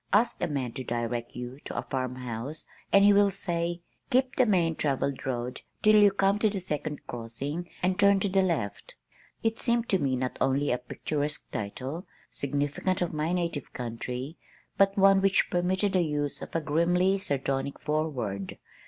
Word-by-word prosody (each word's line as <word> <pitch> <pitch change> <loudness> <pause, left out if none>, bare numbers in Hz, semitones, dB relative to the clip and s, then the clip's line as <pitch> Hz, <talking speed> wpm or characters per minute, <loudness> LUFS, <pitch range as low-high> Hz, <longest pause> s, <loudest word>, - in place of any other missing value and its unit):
Ask 225 +4 +3
a - - +1
man 135 -6 -2
to 130 +2 -6
direct 120 0 -3
you 125 +2 -6
to - - -6
a - - -1
farmhouse 130 +1 -4 0.3
and 200 0 +7
he 205 - +7
will 200 0 +5
say, 175 -3 -2 0.3
"Keep 255 +1 +2
the 255 - +4
main 175 -5 +3
travelled 140 -2 -1
road 125 -1 -3 0.2
till 215 0 +7
you 205 - +8
come 195 +1 +2
to 215 - +3
the 200 -1 -3
second 150 -4 -4
crossing 135 +9 -5
and 185 +1 +1
turn 200 -1 +6
to 200 - +2
the 195 0 +3
left." 160 - -2 0.5
It 225 0 0
seemed 235 -1 +1
to 190 - +3
me 135 -4 +1
not 125 0 -3
only 140 +2 +2
a 125 - +1
picturesque 145 +4 -3
title, 130 - -5 0.2
significant 145 +6 -1
of 175 - -3
my 155 +2 -1
native 170 -6 -2
country, 125 +4 -5 0.4
but 195 +1 +3
one 195 0 +6
which 195 0 +3
permitted 185 +3 +1
the 185 - +4
use 145 -3 -1
of - - -8
a 165 - +2
grimly 175 +5 +2
sardonic 140 -5 -1
foreword. 130 -11 -2
155 Hz, 175 wpm, -28 LUFS, 130-195 Hz, 0.5 s, you